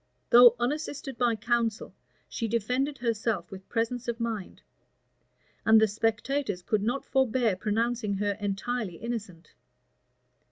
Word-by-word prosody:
Though 240 -1 +9
unassisted 280 +1 -3
by 240 -2 +2
counsel, 230 0 -1 0.3
she 230 - -3
defended 250 +6 -1
herself 225 -6 -2
with 190 0 -10
presence 235 +2 -2
of 235 0 -3
mind; 225 -5 -4 1.0
and 220 0 +6
the 220 - +4
spectators 225 0 -1
could 210 +3 0
not 240 +6 -1
forbear 250 -5 +1
pronouncing 220 +1 -1
her 205 0 -1
entirely 205 0 -3
innocent. 205 -8 -6
230 Hz, 120 wpm, -28 LUFS, 210-245 Hz, 1.0 s, Though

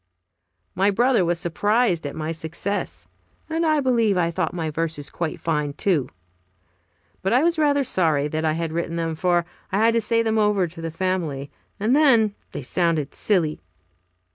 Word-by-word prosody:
My 195 +2 +2
brother 240 +1 +3
was 175 0 +1
surprised 180 0 +1
at 140 - -7
my 160 0 -3
success, 160 - -4 0.4
and 325 +1 -1
I 310 -2 +3
believe 230 -7 +2
I 170 -1 +1
thought 170 -1 -1
my 165 -3 -3
verses 160 -2 -3
quite 165 -2 -3
fine, 150 -3 -1
too. 160 -5 0 1.1
But 195 - 0
I 255 +4 +4
was 335 -1 +1
rather 285 -2 +3
sorry 160 - +1
that 155 +1 -3
I 155 -1 +2
had 165 0 -3
written 170 0 -2
them, 165 -1 -1
for 175 +1 +1 0.3
I 190 - +1
had 225 +2 +4
to 230 - +2
say 230 +1 +2
them 220 -1 +1
over 210 -3 +2
to 165 0 -9
the 165 - -3
family, 165 -5 -2 0.3
and 220 +6 +2
then 235 -9 +4 0.2
they - - -6
sounded 160 0 0
silly. 170 -7 0
175 Hz, 175 wpm, -23 LUFS, 160-220 Hz, 1.1 s, I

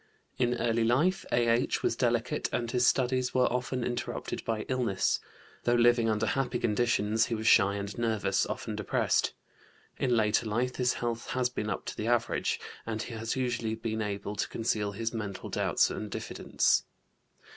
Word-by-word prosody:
In 125 -1 +2
early 115 -1 +1
life 150 +12 +2
A.H. 120 0 +2
was - - +1
delicate - - 0
and 120 -1 -1
his 125 -1 +3
studies 130 -1 +1
were 125 - +5
often 125 0 -1
interrupted 120 0 -3
by 110 -2 -1
illness. 120 -7 0 0.4
Though 120 - +3
living 120 -1 +4
under 110 0 +1
happy 125 +2 0
conditions 115 -1 +1
he 115 - -1
was 110 0 -5
shy 100 -1 +5
and 100 0 -4
nervous, 110 -3 +1
often - - -4
depressed. - - +1 0.7
In 125 -2 +2
later 110 +1 +2
life 120 +4 -1
his 125 -1 +2
health 115 -1 -3
has 125 -1 +1
been 105 -4 -3
up - - -3
to - - -5
the 110 - -3
average, 120 -1 +1 0.2
and 110 -1 -3
he 120 - -7
has 115 0 -3
usually 120 -4 -1
been 110 -1 -3
able 100 0 -3
to - - -1
conceal 105 -3 -1
his 115 +3 -3
mental 105 -4 -5
doubts - - +2
and 105 - -5
diffidence. - - +1
115 Hz, 170 wpm, -30 LUFS, 110-125 Hz, 0.7 s, were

